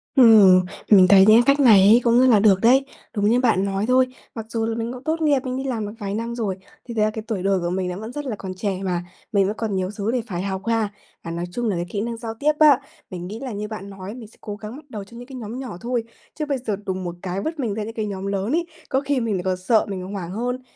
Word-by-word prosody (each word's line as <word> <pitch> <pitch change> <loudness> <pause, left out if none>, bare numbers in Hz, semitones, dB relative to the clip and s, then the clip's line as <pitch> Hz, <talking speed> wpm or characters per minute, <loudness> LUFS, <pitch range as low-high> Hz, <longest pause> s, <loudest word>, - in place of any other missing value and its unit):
Ừm, 210 -8 +7 0.2
mình 190 -3 +7
thấy 195 -1 +8
những 220 +3 +7
cái 275 +2 +4
cách - - -9
này 230 -8 +7
ấy 230 +4 +6
cũng 235 0 +4
rất 255 - +5
là 225 -5 +5
được 200 -2 +4
đấy. 260 +4 +5 0.3
Đúng 205 0 +2
như 240 +2 +3
bạn 225 -6 +2
nói 195 +1 -1
thôi, 255 +1 +4 0.3
mặc 225 -2 -5
dù 225 -1 -1
là 225 0 -2
mình 230 +1 -3
cũng 255 +1 -10
tốt 320 +3 -1
nghiệp, 295 -3 +3
mình 255 0 -3
đi 265 - -3
làm 240 -6 -2
được 205 - -7
vài 200 -2 -4
năm 230 +2 -3
rồi, 205 -6 -2 0.3
thì 235 - -7
thực 220 - 0
ra 215 - +3
cái 220 0 -6
tuổi 205 -6 -3
đời 195 -1 +2
của 175 0 -2
mình 185 +1 -2
nó 180 - -5
vẫn 220 +2 -7
rất 290 +3 -6
là 245 -5 -3
còn 190 -2 -7
trẻ 190 0 -3
mà, 175 -2 -1 0.3
mình 200 -2 +3
vẫn 210 +2 -3
còn 220 -3 -2
nhiều 185 0 -1
xứ 210 +1 -2
để 250 0 0
phải 180 -5 -4
học 190 0 -3
ha. 225 -2 +1 0.3
Và 165 - -6
nói 170 +1 -3
chung 240 +1 -1
là 200 - 0
cái 175 0 -2
kỹ 205 - -3
năng 230 +1 -4
giao 225 -1 -5
tiếp 300 +1 +3
á, 295 -4 +7 0.3
mình 180 -2 -6
nghĩ 215 +4 -7
là 265 -2 -5
như 210 0 -4
bạn 210 -2 -7
nói, 195 +1 -8
mình 235 -4 -10
sẽ 215 - -22
cố 210 -2 -6
gắng 215 +2 -8
bắt 300 +2 -12
đầu 210 -5 -6
trong 235 +4 -14
những 245 - -10
cái 270 - -10
nhóm 235 0 -6
nhỏ 245 -9 -6
thôi, 240 0 -1 0.3
chứ 305 - -3
bây 285 -2 -1
giờ 235 -5 -3
đùng 185 0 -3
một 175 -1 -5
cái 185 +1 -3
vứt 315 +6 -4
mình 235 -6 -1
ra 215 +1 -3
những 225 +2 -7
cái 220 -2 -3
nhóm 195 -2 -5
lớn 200 +3 -2
ấy, 335 +3 +1 0.2
có 265 0 +1
khi 280 -1 0
mình 230 -3 -1
lại 180 - -3
còn 185 0 -1
sợ, 215 +5 +2
mình 185 -2 -5
hoảng 190 -3 -6
hơn. 245 +5 -3
220 Hz, 310 wpm, -22 LUFS, 195-245 Hz, 0.3 s, thấy